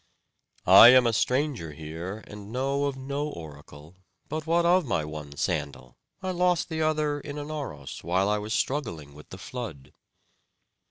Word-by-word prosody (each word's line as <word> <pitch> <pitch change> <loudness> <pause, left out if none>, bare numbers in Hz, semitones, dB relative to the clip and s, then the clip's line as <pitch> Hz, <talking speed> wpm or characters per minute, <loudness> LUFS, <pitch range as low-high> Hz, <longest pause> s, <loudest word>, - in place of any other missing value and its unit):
"I 115 - +10
am 125 0 +7
a 115 - +2
stranger 125 - 0
here, 80 +7 -7
and 105 0 -10
know 135 +3 0
of 140 -1 -2
no 140 +2 -3
oracle; 75 - -11 0.3
but 155 0 -4
what 170 +1 +2
of 180 +1 +4
my 100 - -1
one 75 -2 -8
sandal? 65 -4 -3 0.3
I 185 - -1
lost 180 -1 +1
the 160 -1 -2
other 155 -2 0
in 145 0 -7
Anauros, 145 - -6
while 90 +4 +1
I 105 0 +1
was 105 +1 -6
struggling 85 - -2
with 75 +1 -14
the 95 - -9
flood." 95 - -8
120 Hz, 160 wpm, -27 LUFS, -, 0.3 s, I